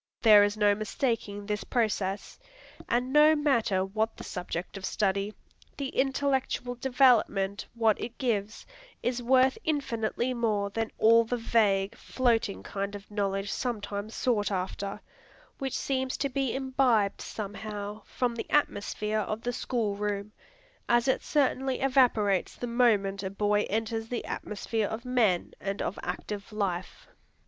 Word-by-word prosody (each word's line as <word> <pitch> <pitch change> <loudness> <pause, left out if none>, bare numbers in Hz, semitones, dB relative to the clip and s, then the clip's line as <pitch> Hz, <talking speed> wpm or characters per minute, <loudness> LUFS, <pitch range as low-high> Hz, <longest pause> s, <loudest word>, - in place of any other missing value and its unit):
There 210 -3 +8
is 205 +1 0
no 205 -1 +4
mistaking 215 -1 -2
this 210 0 -2
process; 205 -4 -1 0.5
and 245 +2 0
no 300 +1 +7
matter 235 -10 +2
what 215 +3 -2
the - - -8
subject 180 0 -5
of 195 - -7
study, 200 +1 0 0.5
the 275 -2 -3
intellectual 265 -2 0
development 245 -6 +2
what 225 -2 +2
it 240 +1 -6
gives, 220 -4 -2 0.4
is 245 0 0
worth 260 +2 +4
infinitely 255 -4 -1
more 210 -4 0
than 225 +1 -2
all 230 +1 +6
that 245 +2 -1
vague, 205 -4 +2
floating 230 -5 0
kind 200 0 -4
of 205 +1 -11
knowledge 200 -1 -1
sometimes 210 -3 -3
sought 215 -5 +1
after, 195 +2 -3 0.6
which 270 -2 -2
seems 260 -1 -1
to 280 - -1
be 270 -1 -1
imbibed 260 -6 +2
somehow 210 0 -6
from 245 -2 -1
the 235 - -6
atmosphere 215 -6 0
of 215 +1 -3
the 245 - -1
school 230 -4 -1
room, 205 0 -3 0.6
as 240 +1 +3
it 260 - +2
certainly 270 -2 +1
evaporates 245 -8 +2
the - - -5
moment 215 -5 +2
a 190 - -3
boy 205 +1 +1
enters 225 +1 -2
the 245 - -3
atmosphere 210 +1 -2
of 220 +3 -5
men 225 -8 +1
and 195 0 -3
of - - -3
active 205 +1 -5
life. 190 -4 -3
220 Hz, 140 wpm, -29 LUFS, 205-250 Hz, 0.6 s, There